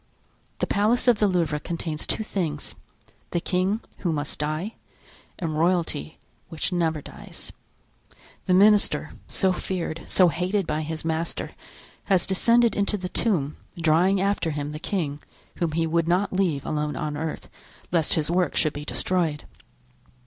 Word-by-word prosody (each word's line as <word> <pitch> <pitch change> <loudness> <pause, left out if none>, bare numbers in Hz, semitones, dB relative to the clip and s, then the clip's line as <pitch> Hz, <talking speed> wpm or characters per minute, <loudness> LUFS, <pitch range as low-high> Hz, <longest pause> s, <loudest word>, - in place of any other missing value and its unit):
The - - 0
Palace 220 +5 +2
of 235 -4 +5
the 210 - +4
Louvre 165 -5 +1
contains 160 -1 -4
two 220 - 0
things—the 170 -2 -5
king, 185 +5 0 0.2
who 175 - 0
must 145 -2 -2
die, 155 +8 -2 0.6
and 160 -3 -2
royalty, 165 - 0 0.3
which 160 +3 -1
never 160 -4 0
dies. - - -8 1.0
The 180 - +4
minister, 205 +2 +4 0.2
so 190 -2 +2
feared, 175 -3 -3
so 185 -2 +5
hated 180 +4 0
by 155 0 -1
his 155 0 -5
master, 165 +1 -2 0.5
has 190 -3 +3
descended 230 +3 +3
into 205 +1 +1
the 180 -2 -5
tomb, 160 -12 0 0.2
drawing 170 +4 +4
after 200 -3 +1
him 145 -1 -3
the 150 - -6
king, 155 -6 -2 0.4
whom 165 -3 0
he 165 +1 +1
would 165 0 +1
not 185 +4 +2
leave 175 -7 +1
alone 150 -1 -1
on 150 +2 -3
earth, 160 +1 -4 0.4
lest 165 -3 +3
his 160 0 0
work 180 +1 +1
should 155 -3 +2
be 145 - -6
destroyed. 165 -5 +1
170 Hz, 150 wpm, -25 LUFS, 155-190 Hz, 1.0 s, of